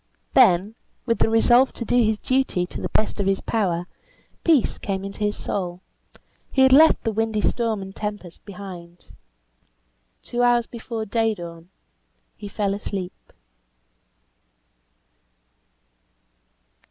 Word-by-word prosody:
Then, 195 Hz, -3 st, +5 dB, 0.3 s
with 230 Hz, -2 st, 0 dB
the -, -, +3 dB
resolve 240 Hz, +3 st, +4 dB
to 235 Hz, -, -6 dB
do 245 Hz, -, 0 dB
his 215 Hz, -1 st, +1 dB
duty 255 Hz, -8 st, 0 dB
to -, -, -8 dB
the -, -, -3 dB
best 215 Hz, -, 0 dB
of 200 Hz, -, 0 dB
his 195 Hz, 0 st, +1 dB
power, 180 Hz, -6 st, -1 dB, 0.6 s
peace 315 Hz, -7 st, +3 dB
came 195 Hz, -1 st, -3 dB
into 195 Hz, +1 st, -7 dB
his 210 Hz, 0 st, 0 dB
soul; 180 Hz, -2 st, -4 dB, 0.7 s
he 265 Hz, -, +4 dB
had 265 Hz, 0 st, +6 dB
left 315 Hz, +4 st, +6 dB
the 225 Hz, -, 0 dB
windy 220 Hz, 0 st, -1 dB
storm 220 Hz, -2 st, 0 dB
and 190 Hz, 0 st, -10 dB
tempest 205 Hz, -5 st, -6 dB
behind. 180 Hz, -3 st, -11 dB, 1.1 s
Two 240 Hz, -, -2 dB
hours 240 Hz, -1 st, +3 dB
before 230 Hz, -1 st, -6 dB
day 225 Hz, +1 st, 0 dB
dawn 170 Hz, -1 st, -10 dB, 0.7 s
he 205 Hz, -, -9 dB
fell 200 Hz, -1 st, -1 dB
asleep. 195 Hz, -2 st, -6 dB
210 Hz, 130 wpm, -23 LUFS, 190-230 Hz, 1.1 s, had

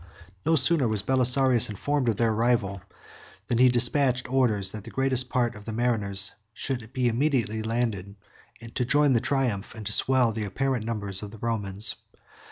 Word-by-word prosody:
19 90 Hz, +2 st, -21 dB
No 165 Hz, -, +4 dB
sooner 140 Hz, -1 st, +3 dB
was 110 Hz, -2 st, 0 dB
Belisarius 130 Hz, -1 st, +3 dB
informed 130 Hz, +5 st, -1 dB
of 110 Hz, -, -1 dB
their 115 Hz, -1 st, +1 dB
arrival, 110 Hz, -4 st, 0 dB, 0.6 s
than 120 Hz, -2 st, -1 dB
he 125 Hz, 0 st, +6 dB
despatched 125 Hz, +1 st, +2 dB
orders 110 Hz, -8 st, +1 dB
that 105 Hz, -2 st, -8 dB
the -, -, -10 dB
greatest 130 Hz, -1 st, 0 dB
part 120 Hz, -2 st, 0 dB
of 105 Hz, -2 st, -13 dB
the 115 Hz, -, -5 dB
mariners 105 Hz, -4 st, 0 dB, 0.2 s
should 120 Hz, -4 st, -4 dB
be 130 Hz, -2 st, 0 dB
immediately 115 Hz, -3 st, 0 dB
landed 110 Hz, -4 st, -3 dB, 0.6 s
to 125 Hz, -, -1 dB
join 145 Hz, +2 st, +3 dB
the 115 Hz, -, +2 dB
triumph, 120 Hz, -7 st, -2 dB
and 110 Hz, -2 st, -9 dB
to -, -, -1 dB
swell 130 Hz, -3 st, +3 dB
the 110 Hz, 0 st, -4 dB
apparent 120 Hz, +3 st, -2 dB
numbers, 100 Hz, -4 st, -3 dB
of 105 Hz, -, -7 dB
the 110 Hz, -, -12 dB
Romans. 105 Hz, -2 st, 0 dB
115 Hz, 175 wpm, -26 LUFS, 105-130 Hz, 0.6 s, he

